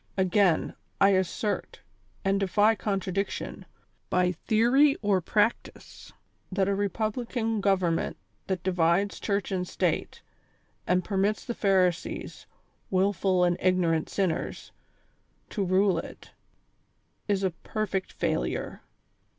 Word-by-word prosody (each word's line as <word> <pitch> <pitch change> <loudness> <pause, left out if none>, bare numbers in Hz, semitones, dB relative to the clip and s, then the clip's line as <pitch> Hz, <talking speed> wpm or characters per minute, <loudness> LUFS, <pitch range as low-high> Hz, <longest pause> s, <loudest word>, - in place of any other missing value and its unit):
Again, 185 -2 +2 0.3
I 195 - +6
assert, 190 +2 -1 0.4
and 195 0 +2
defy 205 +3 +3
contradiction, 195 -2 -3 0.4
by 180 0 +2
theory 240 - +3
or 200 -2 +2
practice, 210 +6 -2 0.4
that 190 0 +1
a - - +1
rei)ublican 220 +2 -1
government 185 -4 +1 0.3
that 190 -3 -2
divides 180 +2 +1
Cliurch 200 -1 -1
and 180 -1 -1
State, - - -2 0.6
and 180 0 +2
permits 200 +1 0
the 240 - -3
i^harisees, 185 -5 0 0.4
wilful 190 -1 +2
and 175 0 +2
ignorant 175 -4 +1
sinners, 185 -4 -2 0.8
to 205 - -1
rule 185 -1 +2
it, - - -10 1.0
is 200 -2 0
a 190 - +1
perfect 195 +2 -3
failure. - - -2
195 Hz, 105 wpm, -27 LUFS, 185-205 Hz, 1.0 s, I